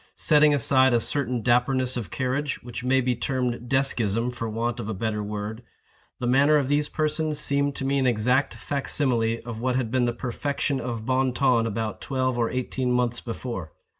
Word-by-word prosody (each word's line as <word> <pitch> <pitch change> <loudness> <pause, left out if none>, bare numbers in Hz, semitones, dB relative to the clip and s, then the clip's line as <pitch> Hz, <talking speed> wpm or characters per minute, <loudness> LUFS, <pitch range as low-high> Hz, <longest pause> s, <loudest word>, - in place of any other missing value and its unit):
Setting 150 -1 +5
aside 130 -2 +4
a - - +4
certain 125 -2 -1
dapperness 125 +1 +2
of 115 -8 -4
carriage, 130 - -2
which 120 0 -7
may 130 +1 +3
be 125 0 0
termed 125 -1 -2
deskism 125 -3 +1
for 115 -2 -4
want 115 +2 -2
of 105 - -4
a 110 - -3
better 105 +1 -2
word, 105 +2 -5 0.6
the 125 - -3
manner 140 +5 +4
of 140 -2 0
these 145 +1 +1
persons 155 0 -1
seemed 140 -1 0
to 135 - -4
me 140 +1 +1
an 130 - +2
exact 125 +4 +1
fac 140 -1 -4
simile 115 -5 +1
of 115 -2 -6
what 125 0 0
had 125 -4 -1
been 130 -1 +2
the 120 - +1
perfection 140 +3 -2
of 115 -3 -4
bon 130 0 +1
ton 120 -3 +2
about 110 -2 -3
twelve 130 -2 -1
or 115 -1 0
eighteen 130 0 -2
months 125 -1 0
before. 115 - -6
125 Hz, 195 wpm, -25 LUFS, 115-135 Hz, 0.6 s, Setting